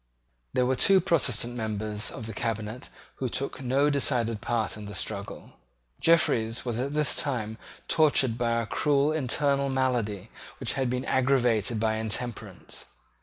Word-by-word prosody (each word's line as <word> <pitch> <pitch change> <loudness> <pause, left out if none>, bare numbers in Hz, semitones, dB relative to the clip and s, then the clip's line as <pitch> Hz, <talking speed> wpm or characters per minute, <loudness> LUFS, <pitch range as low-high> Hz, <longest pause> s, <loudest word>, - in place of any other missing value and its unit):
There 125 - +2
were 130 +1 +2
two 195 +8 +5
Protestant 140 - +1
members 110 -2 -2
of 110 - -7
the 110 - -6
cabinet 110 +3 -4 0.3
who 130 - -2
took 135 +2 -4
no 135 +3 +2
decided 120 -6 +1
part 115 -3 -1
in 105 -1 -8
the 105 0 -7
struggle. 100 +1 -5 0.5
Jeffreys 120 -9 +2
was 120 -1 -2
at 140 +3 -2
this 150 -1 +2
time 110 -6 -2 0.3
tortured 145 -7 +3
by 115 -1 0
a - - -5
cruel 145 +4 +2
internal 140 -1 +1
malady 120 -6 -1 0.3
which 130 - -1
had 130 -2 0
been 125 +1 -2
aggravated 125 -4 +2
by 110 0 +1
intemperance. 110 +2 -4
120 Hz, 150 wpm, -27 LUFS, 110-140 Hz, 0.5 s, two